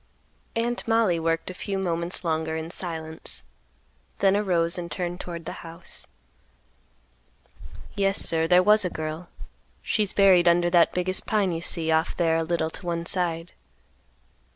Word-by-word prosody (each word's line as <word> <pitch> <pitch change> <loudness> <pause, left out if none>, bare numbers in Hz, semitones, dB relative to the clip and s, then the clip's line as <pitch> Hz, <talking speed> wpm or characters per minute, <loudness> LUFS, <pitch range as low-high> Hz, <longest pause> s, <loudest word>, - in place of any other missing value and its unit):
Aunt 235 +1 -1
Mollie 225 -7 +3
worked 165 +2 -1
a - - -8
few 195 +2 -4
moments 175 -1 -2
longer 160 -1 -1
in 160 +1 -5
silence, 160 - -4 0.7
then 195 0 +3
arose 175 -5 +2
and 170 -1 -6
turned 175 -1 -3
toward 170 -3 -7
the - - -4
house. 165 +1 -8 1.9
"Yes, 195 0 +1
sir, 165 0 +2
there 180 +1 +5
was 210 +2 +5
a 180 - -1
girl; 155 +2 -5 0.5
she's 210 -3 0
buried 185 -3 +5
under 175 0 +4
that 170 -1 +4
biggest 185 +1 0
pine 205 -4 +1
you 165 -1 -3
see 165 -1 +1
off 160 +1 +1
there 165 -2 +2
a - - +1
little 160 -1 -1
to - - -9
one 170 0 -2
side. 170 -2 -1
175 Hz, 155 wpm, -25 LUFS, 165-190 Hz, 1.9 s, there